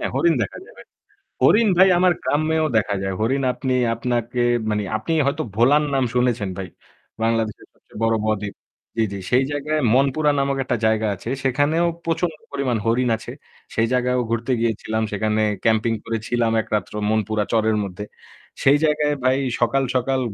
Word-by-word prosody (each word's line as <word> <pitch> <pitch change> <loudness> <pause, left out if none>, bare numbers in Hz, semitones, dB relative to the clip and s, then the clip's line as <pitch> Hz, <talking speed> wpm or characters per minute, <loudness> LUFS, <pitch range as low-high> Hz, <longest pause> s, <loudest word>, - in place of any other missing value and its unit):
হ্যাঁ, - - -2
হরিণ 340 - +3
দেখা - - -5
যাবে। - - -14 0.6
হরিণ 220 +1 +5
ভাই 190 +1 +7
আমার 180 0 +4
গ্রামেও 155 +2 +1
দেখা 100 -1 0
যায়। 95 0 -2
হরিণ 135 +5 +1
আপনি 130 0 -2 0.2
আপনাকে 120 0 -2 0.3
মানে; 105 -1 0
আপনি 110 - -5
হয়তো 145 +3 0
ভোলার 140 +6 +4
নাম 135 -1 +2
শুনেছেন 120 -5 +1
ভাই। 95 -2 -5 0.6
বাংলাদেশের 115 -2 -1
সবচেয়ে - - -14
বড় 115 0 +3
ব-দ্বীপ 105 -2 -2 0.4
জি, 115 - +3
জি। 100 - -5
সেই 125 +2 +4
জায়গায় 150 +1 -1
মনপুরা 140 +3 +3
নামক 140 0 0
একটা 120 - -1
জায়গা 110 0 +2
আছে 105 - -8
সেখানেও 145 +6 +2 0.2
প্রচণ্ড 165 0 -1 0.2
পরিমাণ 130 -4 -1
হরিণ 120 +2 +2
আছে। - - -9 0.4
সেই 115 0 +2
জায়গাও 125 0 +1
ঘুরতে 115 +2 -1
গিয়েছিলাম। 110 -1 -1
সেখানে 110 +1 0 0.2
ক্যাম্পিং 115 0 +2
করেছিলাম 115 +1 -1
একরাত্র 105 -2 -3 0.2
মনপুরা 110 0 0
চরের 110 -1 +2
মধ্যে। 100 +2 -6 0.6
সেই 140 +2 +6
জায়গায় 150 -1 +1
ভাই 130 +1 +3 0.2
সকাল, 135 +3 +2
সকাল 130 +1 +1
120 Hz, 160 wpm, -22 LUFS, 110-140 Hz, 0.6 s, ভাই